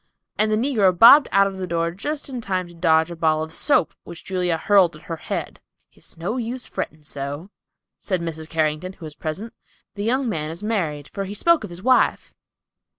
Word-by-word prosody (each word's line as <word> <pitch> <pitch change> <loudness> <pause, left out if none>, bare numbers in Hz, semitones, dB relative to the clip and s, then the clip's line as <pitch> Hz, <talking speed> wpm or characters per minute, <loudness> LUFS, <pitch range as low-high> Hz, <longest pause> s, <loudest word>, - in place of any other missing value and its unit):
And 215 0 +1
the - - +3
negro 215 -7 +2
bobbed 260 - +9
out 200 +1 +5
of 195 -1 -4
the 185 - -3
door 170 -1 -1
just 290 - -4
in 255 -3 -5
time 185 -4 -2
to 175 - -14
dodge 165 -1 +2
a - - -6
ball 155 -1 +1
of 160 0 -7
soap 275 - +1
which 170 - -10
Julia 180 -3 0
hurled 190 -2 +3
at 155 - -15
her 165 -2 -5
head. - - -5 0.3
"It's - - -9
no 190 +9 -3
use 245 +1 -4
fretting 155 0 -6
so," 145 +6 -6 0.5
said 185 -3 -2
Mrs. 160 -2 -6
Carrington, 160 +3 -1
who 175 - -11
was 155 - -8
present. 165 +9 -6 0.4
"The 205 - -5
young 255 +4 +1
man 155 -8 -2
is 170 +5 -8
married, 165 -10 -2
for 195 - -3
he 200 +2 -7
spoke 335 +6 +3
of - - -6
his 175 +2 -9
wife." 255 0 +2
180 Hz, 210 wpm, -22 LUFS, 160-215 Hz, 0.5 s, bobbed